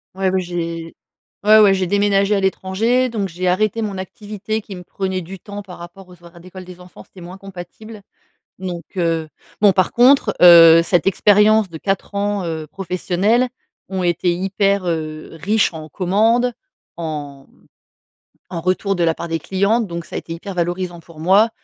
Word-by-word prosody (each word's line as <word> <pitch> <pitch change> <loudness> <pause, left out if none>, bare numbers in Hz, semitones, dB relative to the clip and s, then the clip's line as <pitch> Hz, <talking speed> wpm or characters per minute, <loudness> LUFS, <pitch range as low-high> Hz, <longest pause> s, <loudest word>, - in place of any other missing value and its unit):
Ouais, 190 0 0
ouais 190 0 0
j'ai 170 -2 -5 0.5
ouais, 215 +1 +6
ouais 205 -2 +6
j'ai 190 -1 -1
déménagé 200 +1 +2
à - - +1
l'étranger, 205 +6 0
donc 210 -4 -3
j'ai 180 +2 -4
arrêté 215 +5 +1
mon 205 -3 -4
activité 210 +2 -5
qui 200 -2 -10
me 180 - -10
prenait 190 +1 -4
du 185 +3 -10
temps 205 +1 -9
par 185 -3 -12
rapport 175 +2 -12
aux 180 -1 -17
horaires 170 0 -15
d'école 185 +1 -11
des 180 0 -12
enfants, 180 0 -14
c'était 190 - -18
moins 180 +2 -10
compatible. 195 +3 -11 0.6
Donc, 180 -2 -5 0.2
heu, 165 -2 0 0.3
bon, 205 -2 +6
par 185 -1 +1
contre, 245 -3 +4
heu, 165 -1 +9
cette 170 0 0
expérience 210 +1 +4
de 160 - -8
4 195 +3 -3
ans, 200 -1 -1
heu, 160 -2 -4
professionnelle 190 - 0 0.4
ont 190 0 -3
été 175 0 0
hyper, 195 +2 0
heu, 155 -2 -4
riches 210 +4 +1
en 155 -1 -9
commandes, 220 +8 +1 0.5
en, 145 -4 -6
mmh, - - -28 0.9
en 170 - -4
retour 185 +3 0
de 175 - 0
la 165 -1 +2
part 170 - -7
des 165 0 -2
clients, 200 +8 0
donc 170 -5 -5
ça - - -10
a - - -1
été - - -12
hyper 190 +4 -7
valorisant 175 0 -3
pour 165 -1 -16
moi. 195 +7 +4
185 Hz, 185 wpm, -19 LUFS, 170-205 Hz, 0.9 s, heu